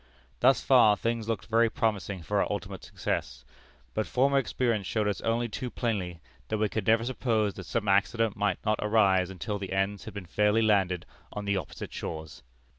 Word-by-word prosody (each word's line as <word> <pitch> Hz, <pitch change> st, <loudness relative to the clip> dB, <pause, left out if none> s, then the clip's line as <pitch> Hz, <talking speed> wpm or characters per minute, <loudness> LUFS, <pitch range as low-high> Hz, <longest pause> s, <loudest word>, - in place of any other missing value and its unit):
Thus 130 Hz, +2 st, +4 dB
far 115 Hz, -6 st, +6 dB
things 115 Hz, +1 st, -2 dB
looked 110 Hz, -4 st, -2 dB
very 115 Hz, 0 st, +3 dB
promising 100 Hz, -5 st, -2 dB
for -, -, 0 dB
our -, -, -1 dB
ultimate -, -, -5 dB
success. 60 Hz, -, -4 dB, 0.5 s
But 110 Hz, -, -1 dB
former 140 Hz, +2 st, +3 dB
experience 115 Hz, -7 st, -1 dB
showed 110 Hz, -2 st, 0 dB
us 100 Hz, -4 st, -1 dB
only 115 Hz, +1 st, 0 dB
too 125 Hz, +3 st, -5 dB
plainly 95 Hz, -9 st, -3 dB, 0.3 s
that 110 Hz, -, -1 dB
we 105 Hz, 0 st, +1 dB
could 105 Hz, -2 st, -3 dB
never 115 Hz, +1 st, +4 dB
suppose 115 Hz, -5 st, 0 dB
that 95 Hz, -, -9 dB
some 115 Hz, -3 st, -2 dB
accident 100 Hz, +2 st, +2 dB
might 100 Hz, -2 st, 0 dB
not 110 Hz, 0 st, +1 dB
arise 100 Hz, -4 st, +3 dB
until 100 Hz, +2 st, -4 dB
the 95 Hz, -1 st, -5 dB
ends 95 Hz, +1 st, -1 dB
had -, -, -9 dB
been 100 Hz, -3 st, -6 dB
fairly 105 Hz, +5 st, +2 dB
landed 95 Hz, -5 st, +2 dB, 0.3 s
on 105 Hz, 0 st, -5 dB
the 100 Hz, 0 st, +1 dB
opposite 95 Hz, -, -6 dB
shores. 80 Hz, -2 st, -6 dB
105 Hz, 190 wpm, -28 LUFS, 95-115 Hz, 0.5 s, far